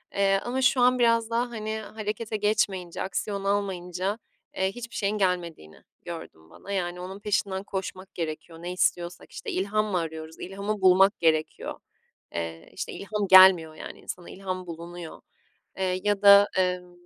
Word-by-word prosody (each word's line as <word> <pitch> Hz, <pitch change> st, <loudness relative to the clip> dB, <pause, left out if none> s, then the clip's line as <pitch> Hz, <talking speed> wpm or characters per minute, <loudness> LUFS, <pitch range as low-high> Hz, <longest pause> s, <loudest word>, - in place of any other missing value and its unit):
eee, 195 Hz, 0 st, +3 dB
ama 255 Hz, +2 st, -2 dB
şu 255 Hz, 0 st, +4 dB
an 250 Hz, +1 st, +4 dB
biraz 230 Hz, -1 st, +3 dB
daha 235 Hz, +2 st, 0 dB
hani, 220 Hz, -2 st, -4 dB
harekete 215 Hz, 0 st, -4 dB
geçmeyince, 200 Hz, -4 st, 0 dB
aksiyon 195 Hz, +1 st, -3 dB
almayınca, 195 Hz, 0 st, -1 dB, 0.4 s
eee, 190 Hz, 0 st, +1 dB
hiçbir 235 Hz, 0 st, -9 dB
şeyin 205 Hz, +1 st, 0 dB
gelmediğini 175 Hz, -, -2 dB, 0.2 s
gördüm 160 Hz, -, -9 dB
bana. 200 Hz, -, -11 dB
Yani 180 Hz, -2 st, -2 dB
onun 190 Hz, +2 st, -7 dB
peşinden 200 Hz, -2 st, -1 dB
koşmak 190 Hz, -1 st, -6 dB
gerekiyor, 165 Hz, 0 st, -5 dB
ne 175 Hz, +1 st, -4 dB
istiyorsak 175 Hz, -1 st, -1 dB
işte -, -, -6 dB
ilham 205 Hz, +3 st, 0 dB
mı 205 Hz, -4 st, -1 dB
arıyoruz, 160 Hz, -1 st, -5 dB
ilhamı 200 Hz, +2 st, -4 dB
bulmak 190 Hz, +2 st, +5 dB
gerekiyor. 155 Hz, -2 st, 0 dB, 0.6 s
Eee, 85 Hz, -1 st, -5 dB
işte -, -, -5 dB
ilham 205 Hz, 0 st, -3 dB
gelmiyor 185 Hz, -4 st, +8 dB
yani -, -, -9 dB
insana, 175 Hz, -1 st, -8 dB
ilham 185 Hz, -1 st, -5 dB
bulunuyor, 170 Hz, 0 st, -8 dB, 0.6 s
eee, 185 Hz, -1 st, -1 dB
ya 205 Hz, -1 st, +1 dB
da 200 Hz, 0 st, +9 dB
emm 180 Hz, -1 st, 0 dB
190 Hz, 150 wpm, -26 LUFS, 175-205 Hz, 0.6 s, da